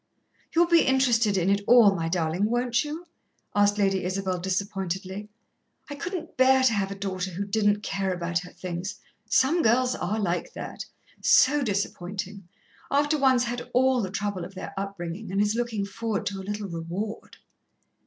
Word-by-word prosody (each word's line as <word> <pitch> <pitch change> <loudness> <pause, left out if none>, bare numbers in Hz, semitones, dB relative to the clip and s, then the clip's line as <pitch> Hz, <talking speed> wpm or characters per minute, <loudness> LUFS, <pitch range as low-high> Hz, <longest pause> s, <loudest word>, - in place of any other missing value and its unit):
"You'll 340 +1 +6
be 335 -1 +5
interested 240 -6 +3
in 180 -1 +1
it 200 0 +2
all, 230 -5 +7
my 165 -3 -2
darling, 170 +2 0
won't 240 +1 +1
you?" 310 +4 -6 0.5
asked 205 0 +3
Lady 195 -2 +1
Isabel 185 0 -2
disappointedly. 190 +1 -3 0.6
"I - - -2
couldn't 335 +3 -6
bear 260 0 +5
to 255 -3 +4
have 195 -2 0
a 200 - -5
daughter 190 -2 -3
who 190 +3 -4
didn't 205 0 +1
care 195 -1 -1
about 170 -1 -1
her 180 0 -10
things 180 +1 -5 0.3
some 275 +9 +3
girls 250 +1 +3
are 215 +4 -2
like 180 -4 -2
that - - -7 0.4
so 290 +3 +5
disappointin'; 200 -3 -3 0.4
after 290 +2 +2
one's 260 -4 +3
had 245 0 -4
all 260 0 +4
the 190 - -3
trouble 200 -1 -3
of 185 +3 -9
their 185 - -7
upbringin' 195 0 -5
and 195 - 0
is 210 +1 +2
lookin' 230 -3 -2
forward 215 0 -3
to 200 -1 -3
a - - -5
little 205 0 -3
reward." 175 +5 -5
205 Hz, 170 wpm, -26 LUFS, 190-240 Hz, 0.6 s, all